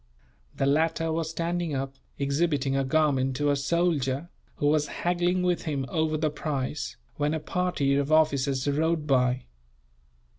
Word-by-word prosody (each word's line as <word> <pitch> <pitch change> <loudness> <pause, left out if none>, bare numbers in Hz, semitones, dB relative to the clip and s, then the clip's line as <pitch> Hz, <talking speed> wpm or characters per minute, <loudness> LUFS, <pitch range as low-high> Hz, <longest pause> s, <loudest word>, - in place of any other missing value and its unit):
The 135 - 0
latter 160 +3 +1
was 160 0 -1
standing 170 -1 -2
up, 135 0 -3 0.2
exhibiting 140 -1 0
a 135 - +2
garment 135 -2 +2
to 145 +1 +1
a - - +2
soldier, 145 -1 0 0.3
who - - -2
was 150 0 +3
haggling 175 +2 0
with 180 -1 0
him 140 -4 -1
over 155 -1 0
the 155 -1 0
price, 145 -1 -3 0.2
when 150 +1 +1
a - - -1
party 180 -5 0
of 140 +1 0
officers 140 -3 +2
rode 155 +2 +1
by. 125 -3 +2
150 Hz, 150 wpm, -27 LUFS, 140-165 Hz, 0.3 s, was